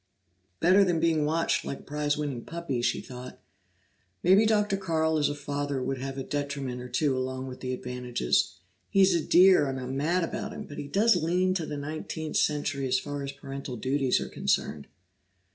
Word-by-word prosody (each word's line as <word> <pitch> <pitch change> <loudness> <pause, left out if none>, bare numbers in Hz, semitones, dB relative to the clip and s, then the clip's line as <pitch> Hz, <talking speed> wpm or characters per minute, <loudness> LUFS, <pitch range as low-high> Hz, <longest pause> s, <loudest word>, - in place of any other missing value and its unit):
"Better 185 +4 +6
than 175 -4 +1
being 160 -3 +2
watched 165 +2 +1
like 140 - -5
a - - -18
prize 145 0 -1
winning 140 -5 -3
puppy," 165 -7 -3
she - - 0
thought. 125 0 -9 0.8
"Maybe 195 +5 +6
Dr. 210 -2 +2
Carl 160 -4 0
as 145 - +2
a 145 - -3
father 145 -1 -3
would 130 +1 -2
have 135 +1 -5
a 135 - -3
detriment 140 -3 -3
or 125 - -8
two 135 +2 +1
along 130 0 -3
with 130 -1 -8
the 130 - -4
advantages. 125 - -1 0.3
He's 195 -2 +5
a 170 - +2
dear, 180 -5 +6
and 135 0 -3
I'm 130 +1 -4
mad 170 +6 +1
about - - -4
him, - - -7
but 145 - -9
he 145 - -5
does 205 +7 +4
lean 180 +3 +1
to 170 -4 -2
the 150 - -4
nineteenth 155 +1 -4
century 140 -2 0
as 130 0 +2
far 145 +2 -4
as 140 0 -4
parental 140 -2 -7
duties 130 +2 +1
are - - -4
concerned." 75 -2 -1
145 Hz, 195 wpm, -28 LUFS, 130-165 Hz, 0.8 s, Better